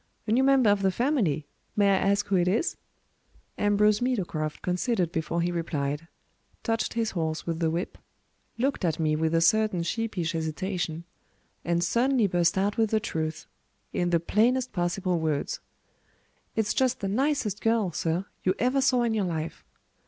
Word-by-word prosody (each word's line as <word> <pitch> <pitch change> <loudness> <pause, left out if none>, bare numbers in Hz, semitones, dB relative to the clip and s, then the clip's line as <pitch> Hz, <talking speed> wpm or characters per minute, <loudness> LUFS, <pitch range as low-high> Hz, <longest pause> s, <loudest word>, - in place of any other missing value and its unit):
"A 215 - -2
new 250 +4 +4
member 265 -5 +5
of 205 -1 +1
the 195 - +3
family! 195 - 0 0.3
May 200 -1 +4
I 195 - +4
ask 200 +1 +2
who 200 - 0
it 180 -1 +3
is?" 225 - +1 0.8
Ambrose 205 +1 +3
Meadowcroft 175 -11 -2
considered 180 -1 0
before 165 +1 -1
he 175 - 0
replied; 150 -2 -2 0.6
touched 225 -1 -1
his 225 -1 0
horse 160 -3 -2
with 165 -1 -2
the 165 -2 +1
whip; 170 +3 -3 0.6
looked 260 -1 0
at 165 -3 0
me 155 -1 +2
with 160 +1 0
a 165 - +3
certain 215 0 +3
sheepish 185 -4 -2
hesitation; 165 +1 -3 0.6
and 170 0 +1
suddenly 240 +5 +2
burst 175 -2 +2
out 200 +2 +1
with 225 -2 +2
the 220 - +2
truth, 160 -5 -3 0.5
in 175 - 0
the 170 -1 +3
plainest 240 +9 +1
possible 180 -1 0
words: 155 -3 -1 1.0
"It's 220 -2 +1
just 255 -1 +1
the 195 - -1
nicest 240 -1 0
girl, 225 -5 +2
sir, 170 +3 -1 0.2
you 185 +1 +1
ever 255 +3 +2
saw 255 -2 +3
in 230 -1 +1
your 210 -3 +1
life." 165 -2 -4
190 Hz, 165 wpm, -27 LUFS, 165-225 Hz, 1.0 s, member